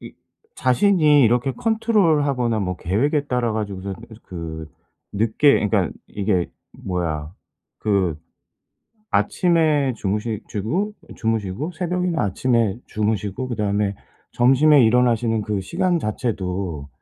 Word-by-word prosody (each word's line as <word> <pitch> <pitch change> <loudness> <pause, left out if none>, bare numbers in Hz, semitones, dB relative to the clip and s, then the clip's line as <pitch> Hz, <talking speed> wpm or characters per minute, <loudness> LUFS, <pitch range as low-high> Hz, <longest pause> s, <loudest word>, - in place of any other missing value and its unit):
이 - - -10 0.4
자신이 150 0 +4
이렇게 120 +3 +2
컨트롤하거나 155 - +1
뭐 90 -2 -2
계획에 140 - 0
따라 125 -4 0
가지고서 100 -3 -4 0.3
그 80 -3 -7 0.5
늦게 115 +7 +3
그러니까 100 -4 +1 0.2
이게 95 -4 -1 0.3
뭐야 80 -4 -3 0.5
그 95 -6 0 0.9
아침에 155 -6 +2
주무시지고 110 - -2 0.2
주무시고 110 - -2
새벽이나 180 -1 -1
아침에 115 +1 +1
주무시고 105 +2 -2
그다음에 105 -3 -1 0.4
점심에 135 +3 +5
일어나시는 115 -1 +2
그 105 -1 -2
시간 175 - 0
자체도 95 - -3
115 Hz, 270 characters per minute, -22 LUFS, 100-145 Hz, 0.9 s, 점심에